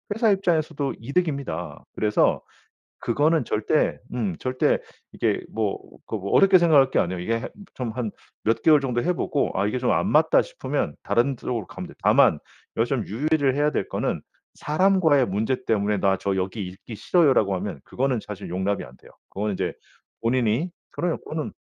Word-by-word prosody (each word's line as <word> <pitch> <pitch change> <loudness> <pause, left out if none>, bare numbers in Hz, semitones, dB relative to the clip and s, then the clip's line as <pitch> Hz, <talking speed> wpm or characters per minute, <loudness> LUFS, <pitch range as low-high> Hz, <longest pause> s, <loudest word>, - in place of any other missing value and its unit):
회사 225 -1 +3
입장에서도 160 -7 0
이득입니다. 135 - -2
그래서 105 -1 +2 0.6
그거는 150 +4 +2
절대, 110 +8 +1 0.2
음 105 -7 -1
절대 130 0 +1 0.3
이게 - - 0
뭐 110 -3 -1 0.3
그 - - -3
뭐 100 -1 -5
어렵게 195 -1 +6
생각할 150 -6 +5
게 - - +1
아니에요. 90 0 -2
이게 115 +4 -2 0.3
좀 125 -3 -3
한 115 -2 -3 0.3
몇 115 +1 +2
개월 155 -2 +6
정도 125 -3 -1
해보고 170 -4 0
아 100 +2 +1
이게 125 - -1
좀 125 - +1
안 - - +1
맞다 - - +4
싶으면 - - -3
다른 130 +3 +1
쪽으로 115 -4 -4
가면 - - -7
됩니다. - - -16
다만 - - +5 0.4
여기서 120 +4 +1
좀 115 - -3
유의를 140 +4 +1
해야 150 +1 +2
될 - - -2
거는 - - -2 0.3
사람과의 160 -4 +3
문제 110 +6 -1
때문에 105 -1 +1
"나 95 0 +2
저 100 - -1
여기 95 +2 -2
있기 95 +5 -10
싫어요."라고 135 - +3
하면 95 -6 -5
그거는 130 -1 -1
사실 105 -3 -7
용납이 95 +3 -1
안돼요 65 +1 -16 0.2
그건 105 +2 -2
인제 95 -1 -2 0.5
본인이 120 +6 +1 0.2
그래요 170 -1 -2
그거는 155 -1 -5
125 Hz, 365 characters per minute, -24 LUFS, 105-150 Hz, 0.6 s, 어렵게